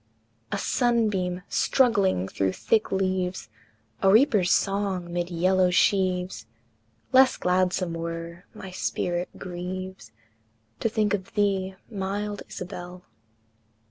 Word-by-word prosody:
A - - 0
sunbeam 200 -6 +1
struggling 200 - +2
through 95 -1 -1
thick 220 - +1
leaves, 185 -1 -1 0.5
A 195 - +4
reaper's 210 -5 +4
song 195 -3 0
mid 175 0 -1
yellow 185 +1 +3
sheaves, 180 - +1 0.6
Less 260 0 +6
gladsome 180 -1 +1
were; 165 +1 -6
my 190 - -8
spirit 175 -1 -2
grieves 185 - -6 0.7
To 225 - +1
think 215 -2 +1
of 190 -2 -4
thee, 195 -2 +1
mild 205 0 -3
Isabel! 180 0 -8
185 Hz, 105 wpm, -26 LUFS, 180-200 Hz, 0.7 s, Less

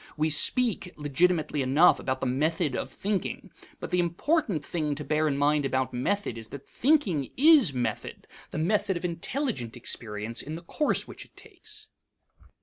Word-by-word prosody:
We 155 +1 +1
speak, 205 - +1
legitimately 150 +1 +1
enough, 140 +7 +5
about 130 0 -3
the - - -1
method 145 +2 0
of - - -3
thinking, 200 -1 -3 0.3
but - - -7
the 180 - +2
important 175 - 0
thing 150 -4 -2
to 150 - -4
bear 155 +1 +1
in 140 -2 0
mind 145 +1 +2
about 130 -1 -1
method 125 - -1
is 110 - -8
that 140 -1 -10
thinking 220 - +1
is 290 - +6
method, 120 -5 -4 0.2
the - - -6
method 190 +3 +1
of 170 - -5
intelligent 170 - -3
experience 110 -1 -5
in 155 - -6
the 170 - -8
course 295 - 0
which - - -9
it - - -23
takes. 430 +1 -12
155 Hz, 165 wpm, -27 LUFS, 135-200 Hz, 0.3 s, is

